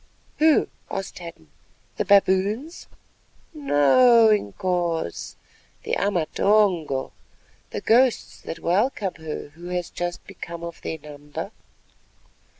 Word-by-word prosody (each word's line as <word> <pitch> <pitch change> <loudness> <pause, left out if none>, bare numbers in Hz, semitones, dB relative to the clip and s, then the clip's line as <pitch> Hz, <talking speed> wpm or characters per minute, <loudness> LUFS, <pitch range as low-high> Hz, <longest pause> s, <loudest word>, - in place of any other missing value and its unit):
"Who?" 310 -1 +4 0.2
asked 195 -1 -5
Hadden; 165 - -11 0.5
"the - - 0
baboons?" 200 - +2 0.7
"No, 235 - +5
Inkoos, 175 - -1 0.5
the - - -1
Amatongo—the 180 -5 -1
ghosts 245 +2 +2
that 165 - -6
welcome 190 +3 0
her 155 -2 -6
who 170 +4 -12
has 180 -1 -3
just 175 0 -4
become 170 -3 -8
of 170 -1 -7
their 160 - -4
number." 145 -1 -8
180 Hz, 95 wpm, -24 LUFS, 160-210 Hz, 0.7 s, No